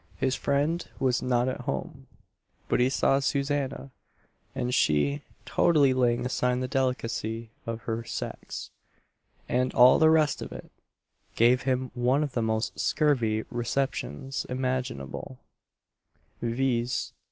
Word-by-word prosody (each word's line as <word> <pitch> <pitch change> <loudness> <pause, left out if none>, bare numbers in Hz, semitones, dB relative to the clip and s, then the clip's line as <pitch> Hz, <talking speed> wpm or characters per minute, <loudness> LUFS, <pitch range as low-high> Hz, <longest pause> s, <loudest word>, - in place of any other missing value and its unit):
His 130 -1 +1
friend 145 +6 0 0.2
was 130 -2 +1
not 125 -1 +1
at 130 - -3
home, - - -5 0.6
but - - +1
he 125 +1 +4
saw 135 0 +2
Susanna, 140 -1 -1 0.6
and 125 +1 -1
she 75 - +2 0.2
totally 145 -6 +4
laying 120 -1 +1
aside 125 0 0
the 130 - -2
delicacy 115 -4 -2 0.2
of 115 0 -4
her 115 -1 -3
sex, - - -6 0.8
"and 125 +1 +1
all 125 +1 +7
the 160 -1 +6
rest 155 -2 +3
of - - -6
it" - - -9 0.6
gave 120 +2 +4
him 130 0 0
one 130 +4 +2
of 145 - -3
the 120 - -1
most 110 0 -1
scurvy 115 -8 +1
receptions 130 - -2
imaginable; 125 - -3 1.0
viz. 120 0 -1
125 Hz, 125 wpm, -27 LUFS, 120-135 Hz, 1.0 s, all